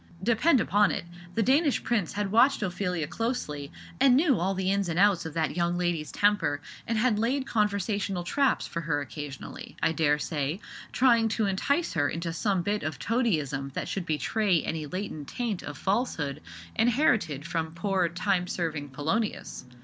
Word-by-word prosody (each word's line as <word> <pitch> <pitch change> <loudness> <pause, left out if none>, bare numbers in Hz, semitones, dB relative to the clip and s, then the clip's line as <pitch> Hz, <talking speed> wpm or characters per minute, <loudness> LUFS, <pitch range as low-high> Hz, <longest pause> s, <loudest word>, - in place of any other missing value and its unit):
Depend 245 - +4
upon 205 0 +3
it, - - -3 0.3
the 225 - +2
Danish 280 +4 +3
prince 215 -9 0
had 205 -1 -2
watched 240 +2 +4
Ophelia 180 -3 -1
closely, 155 - -3 0.3
and 260 -1 +6
knew 280 - +3
all 190 +3 0
the 190 0 0
ins 200 -2 0
and 165 - -2
outs 190 -4 +4
of 160 - -9
that 160 -1 0
young 175 0 +1
lady's 175 -4 -1
temper, 205 -8 +2 0.3
and 230 - 0
had 220 -2 +2
laid 260 +4 0
conversational 200 -4 0
traps 275 +9 +1
for 170 - -4
her 155 -2 0
occasionally, 145 -1 -7
I - - +2
dare 150 -2 +2
say, 150 +3 -2 0.3
trying 235 -3 +4
to 220 - +2
entice 280 - 0
her 145 -5 +1
into 165 0 -3
some 190 0 0
bit 205 +3 0
of 155 -3 -3
toadyism 150 - -1
that - - -3
should 185 -3 -3
betray 170 - +1
any 155 -2 -3
latent 170 -4 -5
taint 230 -6 -3
of 145 0 -7
falsehood 190 - -1 0.3
inherited 220 - +2
from 165 -1 -3
poor 185 -1 +1
time 180 +1 0
serving 160 -5 -3
Polonius. 160 - -2
190 Hz, 170 wpm, -28 LUFS, 160-225 Hz, 0.3 s, and